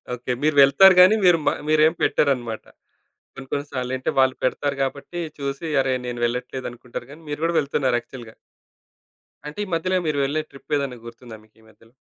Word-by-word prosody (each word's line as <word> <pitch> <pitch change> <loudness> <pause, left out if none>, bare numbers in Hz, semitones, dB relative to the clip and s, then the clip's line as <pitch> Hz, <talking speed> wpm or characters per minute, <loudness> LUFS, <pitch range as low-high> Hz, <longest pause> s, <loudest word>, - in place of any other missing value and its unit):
Okay. 125 +1 -5
మీరు 155 0 +2
వెళ్తారు 185 +8 +7
గాని 185 +4 +7
మీరు 175 -2 +5 0.3
మీరేం 155 +1 +4
పెట్టరన్నమాట. 120 -6 0 0.7
కొన్ని 135 0 -10
కొన్ని 145 0 -2
సార్లంటే 130 0 -3
వాళ్ళు 130 0 +3
పెడతారు 140 +2 -1
గాబట్టి 140 +6 -4 0.2
చూసి 140 +3 -4
అరే 135 -1 0
నేను 120 -1 -5
వెళ్ళట్లేదనుకుంటారు 125 0 -5
గాని 155 - -13
మీరు 145 +1 -5
గూడా 170 +1 +1
వెళ్తున్నారు 140 -3 0
యాక్చువల్‌గా. 120 -3 -12 1.1
అంటే 150 - -9
ఈ - - -13
మధ్యలో 185 +3 0
మీరు 150 -2 -1
వెళ్ళే 150 +3 -1
ట్రిపేదైనా 140 -2 -3
గుర్తుందా 115 0 -11
మీకీ 110 +1 -26
మధ్యలో? 115 +2 -24
135 Hz, 155 wpm, -22 LUFS, 125-150 Hz, 1.1 s, వెళ్తారు